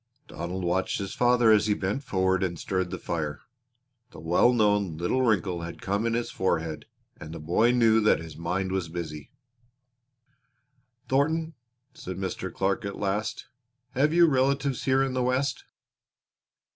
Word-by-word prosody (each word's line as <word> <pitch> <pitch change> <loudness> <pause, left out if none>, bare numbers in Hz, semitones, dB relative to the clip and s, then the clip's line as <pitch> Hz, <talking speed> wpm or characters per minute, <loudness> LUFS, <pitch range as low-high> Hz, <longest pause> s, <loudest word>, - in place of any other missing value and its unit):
Donald 90 +2 -5
watched 90 +2 0
his 100 -1 -4
father 120 -2 +4
as 105 0 +4
he 105 - +2
bent 100 +10 -2
forward 95 -5 +1
and 90 -3 -1
stirred 95 +1 -2
the - - -4
fire. 75 -3 -4 0.7
The - - -13
well 85 +9 +3
known 105 -7 +1
little 90 +10 0
wrinkle 95 -7 +1
had 85 0 -7
come 100 +4 -1
in 115 - 0
his 120 0 -2
forehead 80 -4 -2 0.3
and 80 - -9
the 85 - -7
boy 85 +10 +2
knew 115 -2 +4
that 105 - +4
his 80 -1 -9
mind 90 +3 -2
was 95 -3 -2
busy. 80 -3 -6 1.8
"Thornton," 160 +4 +1 0.4
said 95 -5 -7
Mr. 95 -1 -4
Clark 95 +2 -1
at 100 0 -5
last, 105 +2 -2 0.5
"have 145 +4 +2
you 170 +1 +6
relatives 135 -2 +1
here 135 0 +3
in 135 -1 -2
the 130 - 0
West?" 130 +3 0
100 Hz, 160 wpm, -27 LUFS, 85-125 Hz, 1.8 s, you